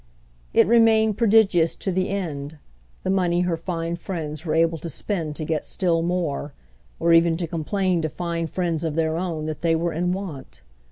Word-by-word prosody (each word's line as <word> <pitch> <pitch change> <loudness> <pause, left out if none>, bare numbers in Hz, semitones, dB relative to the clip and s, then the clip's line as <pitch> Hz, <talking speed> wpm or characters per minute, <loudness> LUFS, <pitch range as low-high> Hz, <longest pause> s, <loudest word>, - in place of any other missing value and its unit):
It - - +5
remained 220 -1 +4
prodigious 200 -7 +4
to 195 - -3
the 185 +1 0
end, 160 -6 -4 0.5
the 190 - 0
money 175 -2 +2
her 180 -2 0
fine 165 0 -3
friends 160 -4 -5
were 160 -3 -1
able 165 0 +2
to 170 - -6
spend 160 -1 -3
to 155 - -3
get 155 -1 -1
still 170 -4 0
more, 165 -5 -2 0.5
or 170 0 +3
even 165 0 +4
to 175 - -2
complain 175 +2 -1
to 155 - -1
fine 170 0 -3
friends 170 -1 -2
of 160 -2 -2
their 160 -1 +1
own 165 -3 -3
that 155 -1 -5
they 165 -1 +2
were 170 +1 -1
in 175 +3 0
want. 150 - -6
170 Hz, 185 wpm, -23 LUFS, 160-185 Hz, 0.5 s, It